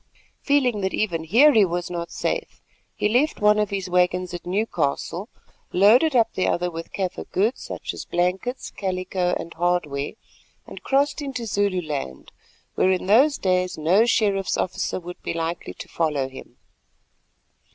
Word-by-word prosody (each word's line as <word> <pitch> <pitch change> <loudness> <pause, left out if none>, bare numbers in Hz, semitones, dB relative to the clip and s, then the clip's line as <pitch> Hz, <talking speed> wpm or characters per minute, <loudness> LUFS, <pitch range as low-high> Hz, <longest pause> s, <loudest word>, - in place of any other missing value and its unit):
Feeling 255 -7 +2
that 190 0 -1
even 170 -6 -1
here 255 - +6
he 220 -3 +6
was 175 -1 -2
not 170 -1 -4
safe, - - -3 0.4
he - - +1
left 250 +8 +1
one 210 0 +4
of 210 -1 +1
his 195 -2 -3
waggons 180 0 +1
at 175 - -7
Newcastle, 180 - -1 0.4
loaded 240 - +5
up 230 -2 +3
the 185 - 0
other 180 0 0
with 165 0 -7
Kaffir 190 -2 -4
goods—such 215 +7 -2
as - - -7
blankets, 180 +9 -2
calico, 185 -2 -2
and 170 - -8
hardware—and 170 -1 -4
crossed 280 +2 +1
into 265 -4 -4
Zululand, 180 - -2 0.4
where 185 - +2
in 185 -1 0
those 260 +9 +5
days 185 -1 0
no 185 +9 +3
sheriff's 200 -4 +1
officer 185 - -2
would 175 0 -10
be - - -4
likely 165 +1 -4
to - - -9
follow 150 -5 -1
him. 135 0 -12
185 Hz, 150 wpm, -23 LUFS, 175-220 Hz, 0.4 s, here